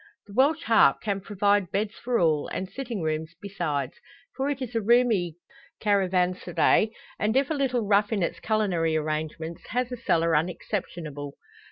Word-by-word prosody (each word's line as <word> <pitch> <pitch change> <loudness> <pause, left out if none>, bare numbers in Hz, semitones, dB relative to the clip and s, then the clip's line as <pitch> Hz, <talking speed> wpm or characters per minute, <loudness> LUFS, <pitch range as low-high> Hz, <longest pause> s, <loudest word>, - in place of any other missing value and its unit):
The 200 - -13
"Welsh 290 +8 +3
Harp" 225 -7 +5
can 200 -2 -2
provide 205 -1 +1
beds 205 +2 -1
for 240 0 -1
all, 155 -5 +2
and 190 - -4
sitting 230 -2 -5
rooms 160 +1 -2
besides. 175 -8 -3 0.4
For 270 +1 -1
it 285 -2 -2
is 250 -3 -5
a 225 - 0
roomy 215 -7 +3 0.4
caravanserai, 185 0 +2 0.3
and 220 +4 +1
if 275 +2 +1
a - - +3
little 255 -5 0
rough 205 +1 +3
in 205 -5 +1
its - - -2
culinary 185 -7 0
arrangements, 155 +2 -4
has 250 +2 -1
a 250 - -4
cellar 165 -7 +1
unexceptionable. 155 -3 -3
200 Hz, 160 wpm, -26 LUFS, 170-230 Hz, 0.4 s, Harp